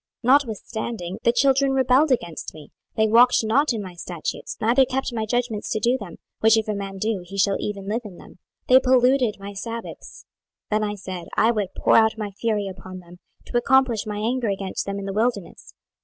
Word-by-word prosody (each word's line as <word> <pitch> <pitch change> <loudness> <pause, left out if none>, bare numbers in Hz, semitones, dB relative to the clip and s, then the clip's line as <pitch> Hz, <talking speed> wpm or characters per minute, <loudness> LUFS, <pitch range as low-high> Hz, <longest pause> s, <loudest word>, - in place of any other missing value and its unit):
26:020:021 250 - +4
Notwithstanding 220 -7 -2
the 235 - +3
children 270 +2 +2
rebelled 265 +3 +3
against 175 -10 -2
me: 150 -2 -13 0.2
they 220 - +3
walked 240 +3 +5
not 265 +7 +2
in 220 -3 -3
my 185 -2 -9
statutes, 175 -1 -6
neither 240 +5 +4
kept 265 0 -2
my 220 -2 -2
judgments 235 -2 -2
to 215 - -1
do 240 +4 +2
them, 205 -9 -7 0.2
which 225 0 +5
if 220 - -1
a 215 - -1
man 195 -1 -5
do, 210 -1 -1
he 195 +3 -9
shall 195 0 +2
even 200 -2 -5
live 220 +4 -1
in 195 -5 -11
them; - - -15 0.3
they 255 +1 +7
polluted 255 -2 +3
my 200 +1 -8
sabbaths: 230 +3 -8 0.5
then 215 0 +1
I 210 0 -2
said, 185 -3 -7
I 225 - +4
would 205 -5 -3
pour - - +4
out 220 0 +3
my 210 -2 -4
fury 210 0 -2
upon 185 -1 -9
them, 175 -1 -14 0.3
to - - -2
accomplish 240 -4 +2
my 210 -1 -4
anger 235 +2 -1
against 195 -1 -3
them 200 0 -3
in 200 - -5
the 195 - -4
wilderness. 215 -3 -3
220 Hz, 205 wpm, -23 LUFS, 195-245 Hz, 0.5 s, they